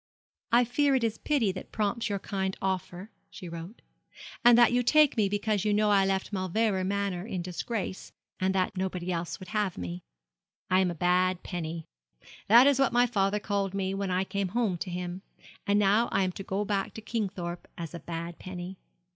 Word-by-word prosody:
'I 240 +1 +6
fear 275 +4 +2
it 255 - +1
is 225 -1 -1
pity 265 -10 +1
that 185 - -9
prompts 220 +2 -1
your 200 - 0
kind 190 -1 -3
offer,' 190 +1 -3 0.2
she 185 - -9
wrote, 170 +6 -8 0.6
'and 240 -1 +8
that 240 -1 +6
you 245 - +3
take 300 +4 +5
me 210 -4 +2
because 205 0 0
you 210 -1 +2
know 210 0 +3
I 195 -1 +4
left 195 +2 -1
Mauleverer 190 +1 0
Manor 200 -1 -2
in 185 -6 -3
disgrace, 185 +2 -4 0.3
and 190 +1 +1
that 185 +1 0
nobody 185 -1 -2
else 170 -1 -3
would 185 - -10
have 210 -3 -1
me. 90 0 -5 0.7
I 185 - +5
am 190 -1 +2
a 175 - -4
bad 180 +2 +2
penny. 165 -2 -5 0.6
That 235 +5 +8
is 280 -1 +4
what 270 - +3
my 245 +1 +4
father 205 -3 +1
called 200 -1 -2
me 190 -1 -1
when 195 0 -2
I 185 +1 +1
came 200 0 -2
home 205 -8 +1
to 185 - -4
him. 180 +1 -4 0.5
And 200 0 +3
now 210 +3 +3
I 195 - +2
am 185 - 0
to 190 - -8
go 195 +2 -2
back 200 -1 -2
to 220 - -7
Kingthorpe 190 -7 -4
as 165 -1 -6
a 170 - -6
bad 170 +1 -6
penny. 185 0 -7
195 Hz, 200 wpm, -29 LUFS, 180-215 Hz, 0.7 s, and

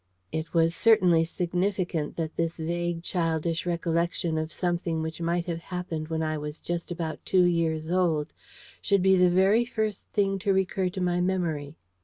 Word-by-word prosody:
It 160 +1 -3
was 165 -1 +3
certainly 180 -7 +5
significant 180 -2 -1
that 160 -1 -3
this 165 0 -1
vague 170 +1 -2
childish 165 -1 -1
recollection 170 -1 0
of 155 +1 -3
something 170 -2 -1
which 160 +1 -5
might 170 +1 0
have 170 -2 -3
happened 170 -3 -5
when 160 0 -2
I 155 -1 -1
was 150 +1 -6
just 175 -1 -4
about 165 -2 -4
two 185 -1 +3
years 165 -2 +1
old 165 -5 +1 0.5
should 200 -2 +2
be 190 0 +5
the 180 -1 +5
very 190 +6 +4
first 220 -4 -3
thing 195 -2 0
to 200 0 +1
recur 190 -1 +1
to 185 +1 -5
my 175 -1 +1
my - - +1
memory. 165 -6 -1
170 Hz, 175 wpm, -27 LUFS, 160-185 Hz, 0.5 s, certainly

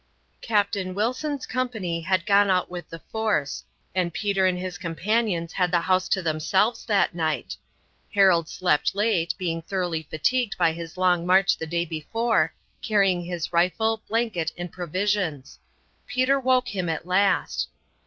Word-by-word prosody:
Captain 200 -4 0
Wilson's 255 +7 -1
company 220 -10 -2
had 185 +2 0
gone 200 -1 +4
out 185 -1 +1
with 175 -1 -7
the 165 - -7
force, 215 -11 -1 0.3
and 175 -3 -1
Peter 195 -2 +1
and 180 -1 +1
his 180 -1 -5
companions 175 0 -1
had 180 -2 +1
the 175 -1 +2
house 185 +1 +1
to 190 - +1
themselves 170 +8 +1
that 205 -5 +2
night. 160 -2 -2 0.6
Harold 185 -5 +4
slept 180 -1 +1
late, 200 -5 +1
being 165 -3 -2
thoroughly 175 -2 -2
fatigued 215 - -1
by 165 - +3
his 165 +1 -8
long 180 -2 +3
march 190 +2 +4
the 160 - -6
day 170 +1 -1
before, 225 +9 0 0.3
carrying 195 -5 +2
his 175 -1 -4
rifle, 220 +6 +1
blanket, 220 -8 0
and 175 0 -5
provisions. 180 -4 -2 0.5
Peter 260 +2 +2
woke 255 -1 +2
him 185 -4 -2
at 160 0 -3
last. 180 - +1
185 Hz, 150 wpm, -25 LUFS, 170-210 Hz, 0.6 s, gone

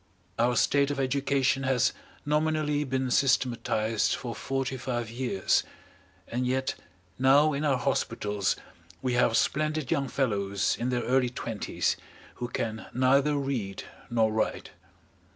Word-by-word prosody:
Our 120 +1 +3
state 140 +3 +3
of 145 -1 -2
education 135 0 +1
has 130 -3 +2 0.3
nominally 150 0 +1
been 130 -1 -1
systematised 120 -5 +1
for 120 -2 -5
forty 135 +1 -2
five 120 -3 -3
years, 120 -6 +1 0.7
and 125 +1 -2
yet 130 +1 0 0.5
now 140 +4 +5
in 140 +2 -2
our 140 -4 +2
hospitals 105 -6 0 0.5
we 125 - 0
have 120 -2 +3
splendid 155 -2 0
young 140 -1 +1
fellows 100 -7 0
in 120 +2 -1
their 125 -1 0
early 125 0 +2
twenties 115 -3 -2 0.4
who 120 - -3
can 110 -2 -4
neither 135 +3 +3
read 130 -9 -2 0.3
nor 115 -2 +2
write. 110 - -1
130 Hz, 130 wpm, -28 LUFS, 120-140 Hz, 0.7 s, now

